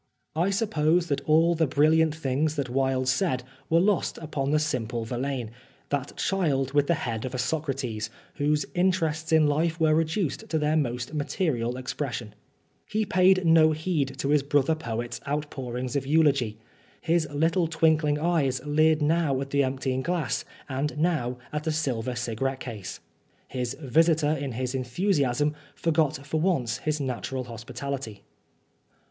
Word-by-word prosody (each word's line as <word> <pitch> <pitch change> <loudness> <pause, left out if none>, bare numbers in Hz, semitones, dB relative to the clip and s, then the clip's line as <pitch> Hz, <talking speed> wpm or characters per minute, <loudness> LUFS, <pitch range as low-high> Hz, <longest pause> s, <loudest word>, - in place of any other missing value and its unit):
I 170 +4 +2
suppose 175 -5 +1
that 140 - 0
all 165 +2 +4
the 160 -2 +1
brilliant 155 +3 +3
things 150 +1 0
that 140 -5 -2
Wilde 130 0 +1
said 130 -1 +1 0.3
were 165 - +4
lost 195 0 +1
upon 145 -4 -3
the 150 - +3
simple 120 -6 -1
Verlaine, 125 -1 -3 0.4
that 140 -1 -3
child 145 -8 0
with 145 -1 +3
the 170 - +3
head 115 -3 -3
of 130 0 -4
a - - -1
Socrates, 135 -7 -2 0.3
whose 150 +1 +1
interests 165 -4 0
in 160 -1 +5
life 160 +3 +1
were 160 -1 +4
reduced 160 +1 -1
to 160 - +1
their 150 0 +1
most 125 -2 -1
material 140 -5 -1
expression. 125 -3 -4
Oscar - - -20
Wilde 105 - -39
He 215 0 0
paid 185 -1 +4
no 160 -1 +6
heed 150 -4 -1
to 140 +1 -2
his 150 -1 +4
brother 145 +2 +2
poet's 120 -6 -4
out 145 +1 -2
pourings 125 -1 -4
of 135 -1 -1
eulogy. 140 -8 +3 0.4
His 165 -1 +1
little 165 +4 +2
twinkling 160 -2 +2
eyes 150 -5 +1
leered 155 +1 +3
now 150 -3 +2
at 135 0 -5
the 140 0 +3
emptying 130 0 -1
glass 165 -7 -1 0.2
and 145 +3 -2
now 150 -7 0 0.2
at 150 0 -2
the 160 - 0
silver 130 -6 -1
cigarette 125 +3 -2
case. 105 -6 -6 0.5
His 125 0 -3
visitor, 155 +2 +3
in 140 -4 -2
his 125 +2 -3
enthusiasm, 140 +1 +1 0.2
forgot 155 -3 0
for 155 +2 -1
once 130 -10 0
his 155 0 -1
natural 130 -1 -3
hospitality. 120 -1 -6
145 Hz, 160 wpm, -26 LUFS, 130-160 Hz, 0.5 s, no